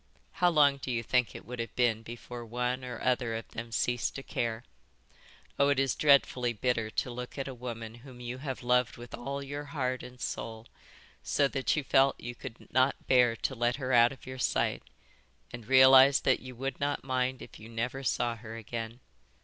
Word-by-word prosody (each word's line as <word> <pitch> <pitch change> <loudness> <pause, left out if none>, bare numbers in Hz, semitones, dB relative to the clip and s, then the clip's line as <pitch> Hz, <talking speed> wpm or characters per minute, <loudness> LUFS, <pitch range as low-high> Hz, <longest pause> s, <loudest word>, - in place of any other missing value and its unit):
How 180 -2 +3
long 145 -4 +4
do 135 - -7
you 120 -2 -1
think 125 +1 +1
it - - -9
would 125 0 -7
have 115 - -5
been 120 -3 +2
before 120 +1 -8
one 125 +2 -2
or 125 -2 -6
other 125 -2 +1
of 115 - -5
them 115 0 -7
ceased 120 +1 0
to 135 - -6
care? 115 -2 -2 1.0
Oh, 140 0 +5
it 140 - +2
is 135 -1 +2
dreadfully 135 -4 +3
bitter 115 0 0
to 125 - -2
look 125 +2 -7
at 135 - -3
a 135 - -5
woman 115 -2 -6
whom 130 -2 -13
you 125 +1 -6
have 135 -3 -5
loved 125 0 +2
with 120 0 -11
all 140 +3 -4
your 145 +1 -5
heart 130 -3 -2
and 125 0 -11
soul, 115 -1 -5 0.6
so 140 - +2
that 135 -2 0
you 150 - -1
felt 135 0 +3
you 120 +1 -6
could 120 -1 -10
not 130 +2 +2
bear 125 -3 +4
to 135 - -2
let 120 0 +1
her 130 -2 -2
out 120 0 +6
of 135 - -12
your 130 0 -7
sight, - - 0 0.7
and 120 -3 -8
realise 130 +1 +8
that 130 - +3
you 130 -1 -10
would 135 +3 -4
not 145 0 -1
mind 130 -1 -1
if - - -13
you 110 +1 -11
never 120 +4 -3
saw 120 -2 0
her 110 0 -9
again. 115 +2 -6
125 Hz, 205 wpm, -30 LUFS, 120-135 Hz, 1.0 s, realise